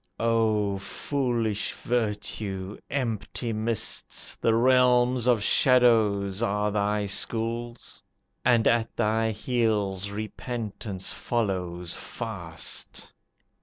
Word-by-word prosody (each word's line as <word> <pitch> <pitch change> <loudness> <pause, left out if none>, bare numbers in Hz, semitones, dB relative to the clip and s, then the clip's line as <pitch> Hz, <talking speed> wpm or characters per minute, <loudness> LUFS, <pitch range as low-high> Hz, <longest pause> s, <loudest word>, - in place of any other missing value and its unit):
"O 110 -3 +1
foolish 120 -2 -1
virtue, 105 -4 -3
empty 115 -2 -2
mists, 110 +1 -1
The 115 - +3
realms 125 0 +4
of 120 -4 +3
shadows, 110 -6 +4
are 105 -2 0
thy 105 0 0
schools, 115 +3 -2 0.4
And 120 -3 +4
at 115 -1 +1
thy 110 0 +1
heels 105 -4 0
repentance 105 -2 -4
follows 90 -6 -2
fast. 85 -9 -4
110 Hz, 85 wpm, -27 LUFS, 100-120 Hz, 0.4 s, realms